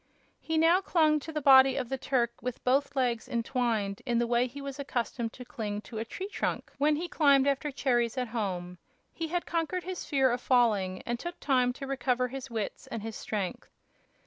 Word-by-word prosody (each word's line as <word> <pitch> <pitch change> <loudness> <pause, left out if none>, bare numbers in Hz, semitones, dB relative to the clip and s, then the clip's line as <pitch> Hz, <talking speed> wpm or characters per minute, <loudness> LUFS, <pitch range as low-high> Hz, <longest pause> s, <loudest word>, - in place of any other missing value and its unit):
He 320 0 -2
now 335 +4 +5
clung 315 -5 +3
to 320 - -8
the 305 -2 -3
body 265 -1 +7
of 255 -3 -2
the 265 - -2
Turk 240 -4 +1
with 250 0 -5
both 275 +2 +1
legs 245 -2 0
entwined, 230 -4 -1
in 240 -2 0
the 240 - +2
way 240 +1 +2
he 265 +3 -9
was 275 0 -6
accustomed 240 -3 -2
to 250 - -10
cling 210 -3 -4
to 220 0 -7
a 225 - -3
tree 380 +11 -6
trunk - - -3
when 295 +1 +3
he 340 +4 -3
climbed 280 -5 +4
after 280 +2 0
cherries 245 -3 0
at 250 -2 -1
home. 180 -6 -3 0.3
He 330 - -3
had 345 +2 -2
conquered 340 +2 -1
his 370 0 -5
fear 270 -4 +2
of 245 - -2
falling, 210 -7 +2
and 240 0 -2
took 345 +4 -6
time 255 -3 +2
to 275 - -7
recover 255 -2 0
his 270 +1 -7
wits 220 -3 -4
and 230 -3 -5
his 225 -1 -5
strength. 200 -4 -4
255 Hz, 205 wpm, -29 LUFS, 235-285 Hz, 0.3 s, body